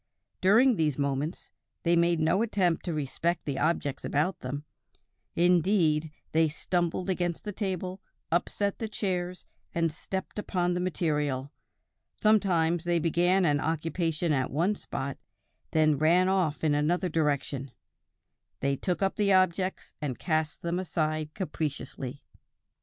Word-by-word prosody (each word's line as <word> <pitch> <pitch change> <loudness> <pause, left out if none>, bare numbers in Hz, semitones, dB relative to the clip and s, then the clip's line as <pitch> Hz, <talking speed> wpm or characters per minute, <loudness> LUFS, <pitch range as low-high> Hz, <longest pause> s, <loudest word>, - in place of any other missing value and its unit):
During 225 +5 +5
these 150 -4 +1
movements, 140 +3 -2 0.3
they 170 0 +3
made 170 0 +3
no 165 +6 +2
attempt 190 -7 +1
to 175 - -1
respect 155 +4 -1
the 140 -2 -2
objects 155 -3 0
about 155 +7 0
them; 145 +4 -5 0.7
indeed, 170 -3 +3 0.2
they 160 0 +4
stumbled 175 +3 -1
against 175 -3 -1
the 210 - -4
table, 185 -2 -3 0.3
upset 200 +4 0
the 225 - -2
chairs 180 -4 -3 0.3
and 165 -1 +2
stepped 190 +5 -5
upon 180 -3 0
the 180 - -1
material; 150 -6 -1 0.7
sometimes 175 -6 +3
they 175 -1 +1
began 175 +3 +3
an 145 -2 +3
occupation 165 +1 -1
at 130 -2 0
one 170 +9 +1
spot, 140 -8 -5 0.5
and 155 -1 +4
then - - -2
ran 175 +4 +4
off 185 -6 +1
in 155 -2 +3
another 165 +6 +1
direction; 145 -4 -1 0.9
they 140 0 +1
took 180 +6 -1
up 195 - 0
the 205 -2 +3
objects 185 0 +1
and 135 -5 -2
cast 155 +1 -1
them 170 +1 -1
aside 155 -4 -1
capriciously." 140 -6 -4
170 Hz, 135 wpm, -28 LUFS, 150-185 Hz, 0.9 s, During